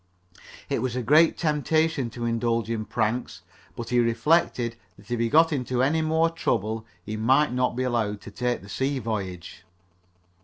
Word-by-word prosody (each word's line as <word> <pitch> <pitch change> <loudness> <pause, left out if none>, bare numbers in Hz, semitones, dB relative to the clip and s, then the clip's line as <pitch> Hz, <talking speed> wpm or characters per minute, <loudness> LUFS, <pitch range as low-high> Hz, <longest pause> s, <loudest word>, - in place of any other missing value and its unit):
It - - -1
was 125 -1 -2
a 125 - -2
great 155 +6 +5
temptation 155 -3 +1
to 120 +1 -5
indulge 115 -1 0
in 110 -2 -2
pranks, 105 -2 -2 0.3
but 120 - -6
he 125 0 +2
reflected 120 0 +2 0.2
that 100 +3 -16
if 120 - -1
he 115 0 +1
got 160 +3 +5
into 125 -2 0
any 160 +4 +2
more 160 +1 +2
trouble 110 - -2 0.2
he 105 +3 -5
might 130 +6 +3
not 125 -1 0
be 130 - -1
allowed 115 -5 -1
to 105 - -10
take 120 +1 -2
the - - -12
sea 135 +5 -1
voyage. 100 -7 -5
120 Hz, 170 wpm, -25 LUFS, 115-145 Hz, 0.3 s, great